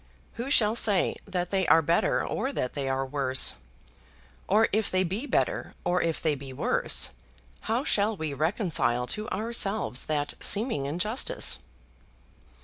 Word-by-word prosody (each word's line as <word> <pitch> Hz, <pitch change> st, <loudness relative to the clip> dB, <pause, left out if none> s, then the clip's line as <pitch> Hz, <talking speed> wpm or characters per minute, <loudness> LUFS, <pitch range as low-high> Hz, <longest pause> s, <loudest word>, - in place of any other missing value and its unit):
Who 240 Hz, +3 st, -5 dB
shall 220 Hz, -6 st, +3 dB
say 205 Hz, -5 st, +2 dB
that 180 Hz, -2 st, -3 dB
they 190 Hz, -2 st, 0 dB
are 165 Hz, 0 st, +5 dB
better 165 Hz, +3 st, +1 dB
or 265 Hz, -, -2 dB
that 125 Hz, -, -3 dB
they 140 Hz, -2 st, -3 dB
are 135 Hz, 0 st, -1 dB
worse? 130 Hz, -1 st, +2 dB, 0.9 s
Or 215 Hz, +3 st, +4 dB
if 215 Hz, +1 st, +1 dB
they 185 Hz, 0 st, +1 dB
be 200 Hz, +10 st, -3 dB
better, -, -, -1 dB
or 180 Hz, 0 st, +1 dB
if 165 Hz, -1 st, -1 dB
they 155 Hz, -, +1 dB
be 140 Hz, -1 st, -7 dB
worse, -, -, +1 dB, 0.6 s
how 235 Hz, +4 st, +1 dB
shall 210 Hz, -5 st, +1 dB
we 155 Hz, -3 st, -4 dB
reconcile 155 Hz, -, 0 dB
to 210 Hz, +11 st, -3 dB
ourselves 215 Hz, -, 0 dB
that 145 Hz, -1 st, -1 dB
seeming 205 Hz, -, +1 dB
injustice? 195 Hz, -, +1 dB
180 Hz, 145 wpm, -27 LUFS, 145-215 Hz, 0.9 s, are